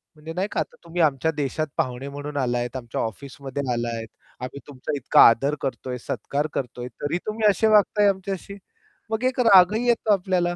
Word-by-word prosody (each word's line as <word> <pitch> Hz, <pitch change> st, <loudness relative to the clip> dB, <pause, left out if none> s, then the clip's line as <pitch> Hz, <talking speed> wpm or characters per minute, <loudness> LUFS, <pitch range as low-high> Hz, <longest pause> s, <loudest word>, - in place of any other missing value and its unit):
म्हणजे 155 Hz, +1 st, -9 dB
नाही 185 Hz, +3 st, -1 dB
का -, -, -1 dB
आता -, -, -3 dB
तुम्ही 170 Hz, +1 st, -3 dB
आमच्या 155 Hz, +1 st, +2 dB
देशात 150 Hz, +1 st, -2 dB
पाहुणे 130 Hz, +2 st, -2 dB
म्हणून 145 Hz, +1 st, -6 dB
आलात 120 Hz, -2 st, -1 dB
आमच्या 120 Hz, -2 st, -4 dB
ऑफिसमध्ये 135 Hz, +5 st, -5 dB
आलात. 120 Hz, -1 st, -3 dB, 0.4 s
आम्ही 130 Hz, +2 st, -6 dB
तुमचा 145 Hz, +2 st, -6 dB
इतका 135 Hz, -, +4 dB
आदर 135 Hz, +6 st, +1 dB
करतोय, 130 Hz, -1 st, -4 dB
सत्कार 145 Hz, +5 st, -3 dB
करतोय 125 Hz, -1 st, -4 dB
तरी 145 Hz, +4 st, -1 dB
तुम्ही 215 Hz, 0 st, -1 dB
असे 210 Hz, +3 st, +2 dB
वागताय 210 Hz, -1 st, +4 dB
आमच्याशी. 195 Hz, +1 st, -4 dB, 0.5 s
मग 220 Hz, +2 st, -2 dB
एक 255 Hz, 0 st, 0 dB
रागही 215 Hz, +1 st, +6 dB
येतो 225 Hz, -3 st, +3 dB
आपल्याला 180 Hz, -2 st, 0 dB
150 Hz, 170 wpm, -24 LUFS, 130-195 Hz, 0.5 s, रागही